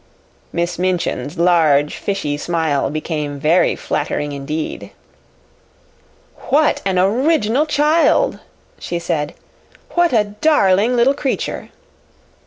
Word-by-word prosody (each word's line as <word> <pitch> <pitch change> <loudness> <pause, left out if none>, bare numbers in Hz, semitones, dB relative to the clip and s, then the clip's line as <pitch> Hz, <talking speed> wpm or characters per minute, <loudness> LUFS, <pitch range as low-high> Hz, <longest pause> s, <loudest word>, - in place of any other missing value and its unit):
Miss 170 0 -2
Minchin's 180 -3 -2
large, 160 -4 +3
fishy 195 -8 -2
smile 155 -3 -1
became 150 -1 -4
very 160 +5 +3
flattering 145 0 -3
indeed. 145 +3 -5 1.6
"What 300 +2 +2
an 190 -1 0
original 245 - +2
child!" 305 +10 +2 0.4
she 175 - -4
said. 170 -2 -3 0.6
"What 345 -1 +2
a 220 -3 +3
darling 210 -1 +2
little 245 +3 +4
creature!" 275 -1 -3
180 Hz, 95 wpm, -18 LUFS, 155-245 Hz, 1.6 s, little